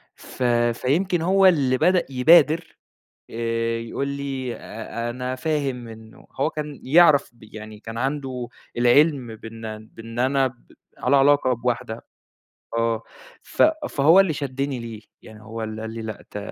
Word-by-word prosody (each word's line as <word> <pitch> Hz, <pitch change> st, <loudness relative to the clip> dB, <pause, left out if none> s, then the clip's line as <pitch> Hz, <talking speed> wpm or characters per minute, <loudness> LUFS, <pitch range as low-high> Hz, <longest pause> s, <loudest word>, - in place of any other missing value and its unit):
ف 130 Hz, -, -7 dB, 0.3 s
فيمكن 170 Hz, -, 0 dB
هو 190 Hz, +3 st, +3 dB
اللي 140 Hz, -8 st, +4 dB
بدأ 180 Hz, +5 st, +3 dB
يبادر 160 Hz, +5 st, +4 dB, 0.5 s
آآ 115 Hz, 0 st, -1 dB
يقول 115 Hz, +4 st, -4 dB
لي: 135 Hz, -3 st, -4 dB
"آآ، 115 Hz, +2 st, -6 dB
أنا 125 Hz, +1 st, -4 dB
فاهم 135 Hz, -4 st, -2 dB
إنه" 110 Hz, 0 st, -13 dB
هو 145 Hz, -, +2 dB
كان 150 Hz, -2 st, -6 dB
يعرف 150 Hz, 0 st, +5 dB
ب -, -, -25 dB
يعني 105 Hz, -1 st, -9 dB
كان 115 Hz, +1 st, -7 dB
عنده 130 Hz, -2 st, -3 dB, 0.3 s
العِلْم 125 Hz, -1 st, +3 dB
بإن 110 Hz, -1 st, -8 dB
بإن 115 Hz, +1 st, -9 dB
أنا 135 Hz, +2 st, +2 dB
ب 130 Hz, -1 st, -10 dB, 0.3 s
على 140 Hz, -, +2 dB
علاقة 140 Hz, -1 st, +4 dB
بواحدة 120 Hz, -1 st, -3 dB, 0.7 s
آه. 115 Hz, -1 st, 0 dB, 0.4 s
ف -, -, 0 dB, 0.3 s
فهو 160 Hz, +7 st, +5 dB
اللي 190 Hz, -4 st, +2 dB
شَدِّني 140 Hz, -2 st, -3 dB
ليه. 115 Hz, -2 st, -8 dB, 0.2 s
يعني 110 Hz, -1 st, -14 dB
هو 110 Hz, +1 st, -7 dB
اللي 110 Hz, 0 st, -6 dB
قال 110 Hz, -, -5 dB
لي: 115 Hz, -, -5 dB
"لأ، 110 Hz, -2 st, -7 dB
ط -, -, -6 dB
125 Hz, 150 wpm, -23 LUFS, 115-145 Hz, 0.7 s, يعرف